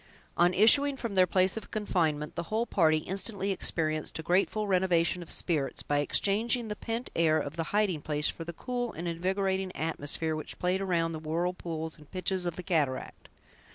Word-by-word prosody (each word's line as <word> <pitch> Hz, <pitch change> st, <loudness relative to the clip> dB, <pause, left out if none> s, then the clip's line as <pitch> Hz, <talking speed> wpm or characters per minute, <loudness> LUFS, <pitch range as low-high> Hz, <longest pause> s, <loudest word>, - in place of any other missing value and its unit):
On 175 Hz, +1 st, +4 dB
issuing 275 Hz, +8 st, +5 dB
from 235 Hz, -5 st, -4 dB
their 185 Hz, -1 st, +5 dB
place 185 Hz, +3 st, +2 dB
of 225 Hz, -, -7 dB
confinement, 160 Hz, -8 st, -1 dB
the 170 Hz, -, -3 dB
whole 225 Hz, +2 st, 0 dB
party 160 Hz, -8 st, +3 dB
instantly 195 Hz, +4 st, -3 dB
experienced 155 Hz, -4 st, 0 dB
a 160 Hz, -, -6 dB
grateful 195 Hz, +5 st, +1 dB
renovation 180 Hz, -2 st, +2 dB
of 170 Hz, -, -10 dB
spirits, 150 Hz, -6 st, -1 dB
by 145 Hz, 0 st, 0 dB
exchanging 220 Hz, -, +1 dB
the 210 Hz, -, -3 dB
pent 230 Hz, +3 st, -4 dB
air 160 Hz, -2 st, +3 dB
of 145 Hz, -1 st, -3 dB
the 165 Hz, -1 st, -2 dB
hiding 200 Hz, -6 st, 0 dB
place 150 Hz, 0 st, -1 dB
for 165 Hz, -, -4 dB
the 170 Hz, -, -6 dB
cool 245 Hz, +6 st, -4 dB
and 170 Hz, +1 st, -5 dB
invigorating 190 Hz, +2 st, -1 dB
atmosphere 160 Hz, 0 st, 0 dB
which 155 Hz, -, -7 dB
played 180 Hz, +2 st, 0 dB
around 170 Hz, -3 st, 0 dB
the 160 Hz, -, -5 dB
whirlpools 160 Hz, 0 st, -3 dB
and 150 Hz, -, -17 dB
pitches 185 Hz, -1 st, 0 dB
of 170 Hz, -, -3 dB
the 180 Hz, -, -6 dB
cataract. 150 Hz, -8 st, -2 dB
180 Hz, 185 wpm, -29 LUFS, 160-195 Hz, -, issuing